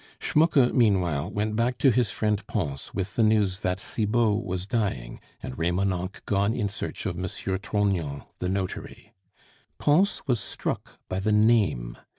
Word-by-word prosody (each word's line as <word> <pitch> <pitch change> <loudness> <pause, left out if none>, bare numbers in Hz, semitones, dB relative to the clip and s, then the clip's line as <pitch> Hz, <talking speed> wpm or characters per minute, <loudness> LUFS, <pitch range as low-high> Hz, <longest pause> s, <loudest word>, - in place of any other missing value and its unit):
Schmucke 150 -5 +3
meanwhile 90 - +2
went 105 +1 -1
back 120 +2 +1
to 135 - +5
his 120 0 +2
friend 105 -1 0
Pons 70 -10 -3
with 95 0 -4
the - - +2
news 105 -4 +3
that 90 -2 -1
Cibot 110 +1 +1
was 95 -2 -3
dying, 95 - -2 0.2
and 65 - -5
Remonencq 90 +2 -1
gone 100 +3 +1
in 105 -4 0
search 105 - -6
of 95 -4 -1
M. 90 - -2
Trognon, 95 -5 -1 0.2
the 90 - -1
notary. 95 -1 -4 0.6
Pons 175 +8 +2
was 125 -5 +1
struck - - -5
by 95 - -2
the 105 +3 0
name. 105 - +2
100 Hz, 155 wpm, -26 LUFS, 90-110 Hz, 0.6 s, to